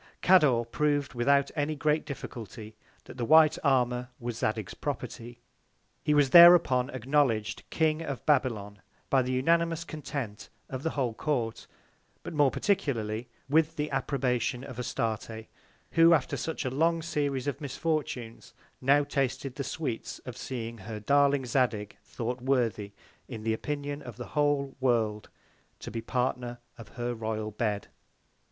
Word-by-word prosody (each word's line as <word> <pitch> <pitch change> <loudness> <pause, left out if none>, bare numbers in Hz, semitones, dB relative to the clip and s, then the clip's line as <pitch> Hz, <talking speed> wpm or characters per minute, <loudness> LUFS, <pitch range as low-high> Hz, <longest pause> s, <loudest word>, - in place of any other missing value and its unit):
Cador 150 -11 +5
prov'd, 145 +3 0
without 140 +3 +2
any 155 +1 -1
great 150 +1 0
Difficulty, 110 -5 -8 0.3
that - - -12
the 120 - -2
White 155 +4 +6
Armour 125 -3 +1
was 120 -1 -4
Zadig's 110 -2 -2
Property. 120 +1 -5 0.6
He 150 0 +1
was 145 -3 +3
thereupon 170 -7 +8
acknowledg'd 130 -5 0
King 160 0 +1
of 140 -5 -5
Babylon, 105 -8 0 0.3
by 135 - +5
the 130 0 -2
unanimous 165 +5 +2
Content 140 -10 -6 0.2
of 130 -1 -4
the 160 - -1
Whole 125 -4 0
Court; 120 -4 -2 0.6
but - - -6
more 145 -3 +4
particularly 120 - -1 0.2
with 160 +3 +2
the 150 -1 -3
Approbation 130 -2 -1
of 130 -3 -8
Astarte, 115 -2 -3 0.5
who 165 0 +6
after 145 0 -1
such 155 +3 -4
a 130 - -1
long 165 +4 +1
Series 145 -5 -1
of 145 +1 -3
Misfortunes, 140 -5 -3 0.3
now 140 +3 +4
tasted 135 -1 -2
the 140 - -4
Sweets 130 -5 -4
of 125 - -7
seeing 115 -3 -6
her 105 +2 -7
darling 140 +3 +3
Zadig 120 -5 0
thought 125 +1 -4
worthy, 120 -6 0 0.3
in 115 -4 -7
the 110 0 +1
Opinion 145 +4 -4
of - - -10
the - - -7
whole 145 -2 +1
World, 110 -5 0 0.5
to - - -7
be 115 - -3
the 115 - -11
Partner 125 -1 -1 0.2
of 115 -3 -12
her 120 0 -2
royal 110 -1 -3
Bed. 105 -1 -2
130 Hz, 145 wpm, -29 LUFS, 115-145 Hz, 0.6 s, thereupon